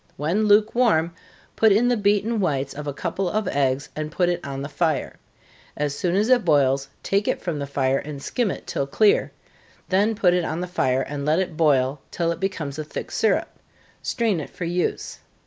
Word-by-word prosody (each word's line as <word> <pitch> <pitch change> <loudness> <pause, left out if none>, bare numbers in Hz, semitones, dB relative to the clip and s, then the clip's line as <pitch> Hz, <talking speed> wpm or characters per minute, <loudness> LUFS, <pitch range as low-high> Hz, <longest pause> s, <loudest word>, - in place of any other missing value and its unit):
When 170 +9 0
lukewarm, 210 -5 +3 0.4
put 220 -1 +4
in 220 +5 +4
the 245 - +3
beaten 210 +2 +1
whites 140 -7 -1
of 150 0 -7
a - - -1
couple 185 +6 -2
of 215 +1 -1
eggs, 135 -2 0
and 155 0 -4
put 175 +2 +1
it 175 0 -2
on 135 0 -5
the - - -4
fire. 155 +1 -1 0.6
As 145 -1 -1
soon 175 +4 -1
as 210 +3 +2
it 250 -3 +4
boils, 135 -4 +2
take 200 +1 0
it - - 0
from 165 -5 -3
the 140 - -4
fire, 135 -1 +1
and 150 -1 -7
skim 235 - -1
it - - -6
till 140 - -2
clear 210 +9 +3 0.6
then 205 +4 +2
put 185 -5 +3
it 180 -1 +1
on 160 0 -3
the 180 - -2
fire, 135 -7 0
and 145 0 -5
let 155 +2 +2
it 180 -3 -1
boil 140 -3 +2
till 170 -1 -1
it 170 - -4
becomes 160 -7 -3
a - - -2
thick 150 - -7
syrup - - 0 0.4
strain 220 -7 0
it 150 - -6
for 175 - -6
use. 175 +1 -2
170 Hz, 205 wpm, -23 LUFS, 140-200 Hz, 0.6 s, put